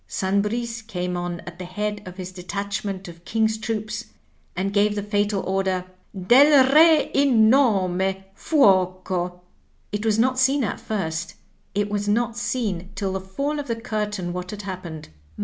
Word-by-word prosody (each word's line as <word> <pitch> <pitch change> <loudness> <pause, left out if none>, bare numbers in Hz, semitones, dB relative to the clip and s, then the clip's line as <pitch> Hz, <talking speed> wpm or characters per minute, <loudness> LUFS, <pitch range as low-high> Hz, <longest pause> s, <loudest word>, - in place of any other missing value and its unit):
San 195 +1 0
Bris 230 +2 -3
came 180 -5 -4
on 175 -1 -4
at 175 0 -11
the 180 - -5
head 210 +3 -3
of 185 0 -9
his 185 -1 -6
detachment 195 +1 -4
of 170 0 -12
King's 220 +2 0
troops 215 0 -3 0.5
and 195 +3 -2
gave 205 +1 +3
the 205 - -2
fatal 205 -1 0
order, 190 -1 -1 0.3
*Del 265 +6 +6
Re 315 -1 +6
in 240 -6 +5
nome, 200 -10 +3 0.3
Fuoco!' 185 - +1 0.5
It 210 0 -3
was 220 -1 +2
not 255 +3 +2
seen 265 +1 +3
at 215 - -2
first, 170 -5 -3 0.4
it 205 0 +1
was 205 0 -1
not 230 +2 +1
seen 210 -7 -2
till 195 -1 -2
the 190 - -3
fall 280 +11 -3
of 285 - -5
the 230 - -1
curtain 210 -6 -3
Vhat 180 0 -5
had 210 0 -6
happened. 180 - -7
205 Hz, 165 wpm, -23 LUFS, 185-230 Hz, 0.5 s, Del